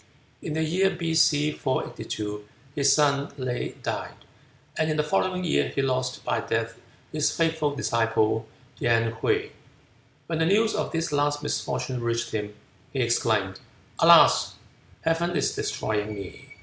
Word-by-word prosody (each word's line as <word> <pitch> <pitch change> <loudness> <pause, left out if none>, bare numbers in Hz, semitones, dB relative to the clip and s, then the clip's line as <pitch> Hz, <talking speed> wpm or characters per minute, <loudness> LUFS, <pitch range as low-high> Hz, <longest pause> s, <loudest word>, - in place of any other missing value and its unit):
In 150 - -4
the 160 +1 0
year 185 +5 +2
B.C. 160 -4 +2
482 105 -7 -4 0.3
his 140 -1 +3
son 140 -1 +2
Le 130 -2 -2
died, - - -5 0.6
and 155 - 0
in 155 - 0
the 150 - +2
following 185 +4 0
year 170 - +1
he 140 - -1
lost 130 -1 -1
by - - 0
death 115 +1 -2 0.3
his 155 -1 +1
faithful 160 -3 0
disciple 115 -4 +1 0.3
Yen 115 -1 +2
Hwuy. - - +1 0.7
When 165 -1 -3
the 160 - +2
news 220 +4 +3
of - - -2
this 165 0 -2
last 145 0 0
misfortune 125 -2 -2
reached 115 0 -1
him, 105 -1 -4 0.4
he 135 - -3
exclaimed, 110 -5 +1 0.4
"Alas! - - +6 0.5
Heaven 170 +2 0
is - - +1
destroying 105 0 -2
me!" 100 -3 -10
140 Hz, 140 wpm, -26 LUFS, 115-160 Hz, 0.7 s, Alas